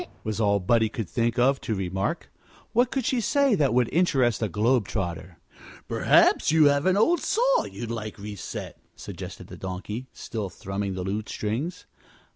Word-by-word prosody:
"Is - - -7
it?" - - -26
was 110 0 -2
all 100 -1 +3
Buddie 110 +4 +2
could 110 -2 -4
think 115 +2 -1
of 135 +3 +3
to 110 - -2
remark. 95 - -3 0.4
What 240 +1 +3
could 265 -3 -2
she 250 -2 +1
say 280 +3 +3
that 150 -9 +2
would 125 -1 +3
interest 135 -10 +2
a 110 - 0
globe 110 +4 +2
trotter? 90 -3 -4 0.5
"Perhaps - - +4
you 160 -1 +5
have 145 +3 +3
an 185 +1 +3
old 330 +11 +4
saw - - +2
you'd 115 -1 -6
like 110 -2 -5
reset," 100 -1 -7 0.2
suggested - - -8
the - - -11
Donkey, 95 +7 -5
still 105 -4 -5
thrumming 95 +1 -4
the 90 - -3
lute 105 +3 -3
strings. 120 +12 -3
115 Hz, 180 wpm, -26 LUFS, 100-155 Hz, 0.5 s, you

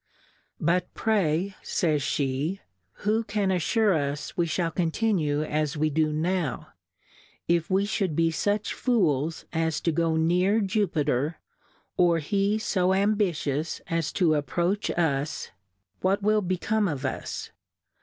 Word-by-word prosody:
But 180 +3 +1
pv^Yj 195 -3 +1
fays 155 -4 0
fie^ 140 +8 -1 0.5
who 220 +2 +2
can 205 -2 0
affure 200 +4 +2
us 145 -2 -2
we 170 -1 +1
fhall 165 0 -1
continue 165 -4 +1
as 150 0 -1
we 155 +1 +1
do 155 +1 +1
now? 165 0 -1 0.8
If 170 +1 +1
we 195 +1 +2
fhould 195 -6 -1
be 165 +1 +2
fuch 205 +6 -1
Fools 165 - 0
as 160 -1 0
to 165 - +1
go 165 +1 +1
near 180 +6 +3
Jupter^ 165 - 0 0.6
or 175 -2 +4
he 200 +6 +1
fo 190 -4 +1
Ambitious 180 -7 0
as 165 -3 -1
to 165 -5 +3
ap 145 -2 -1
proach 180 +7 0
us, 150 -3 -1 0.5
what 195 +2 +1
will 215 +1 +3
become 200 +3 0
of 145 -5 -3
us 130 - -4
170 Hz, 135 wpm, -26 LUFS, 155-200 Hz, 0.8 s, or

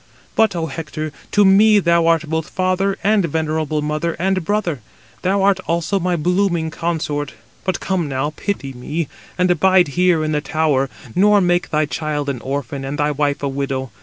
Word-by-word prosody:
But, 220 -4 +3
Ο 165 -1 -1
Hector, 155 -1 -5 0.2
to 205 -1 +4
me 210 +3 +6
thou 170 -3 +3
art 165 -1 +2
both 160 0 -2
father 185 +1 0
and 210 -1 +3
venerable 155 -1 -1
mother 155 +3 -1
and 185 +1 0
brother; 180 -6 -1 0.4
thou 195 +1 +1
art 195 -1 +3
also 170 +3 0
my 180 0 0
blooming 175 -1 0
consort. 150 -3 -3 0.3
But 185 -2 -1
come 180 -6 -1
now, 135 +2 -1
pity 145 -10 -3
me, 145 +5 -4 0.3
and 180 0 +3
abide 180 0 +4
here 175 +1 +2
in 155 - -1
the 150 -1 0
tower, 150 -4 +1 0.2
nor 205 +2 +5
make 175 0 +1
thy 155 0 +1
child 150 -1 -3
an 125 -4 -4
orphan 135 0 -4
and 135 +2 -4
thy 150 0 +1
wife 145 0 -1
a - - +1
widow. 135 -2 -3
160 Hz, 180 wpm, -19 LUFS, 150-185 Hz, 0.4 s, me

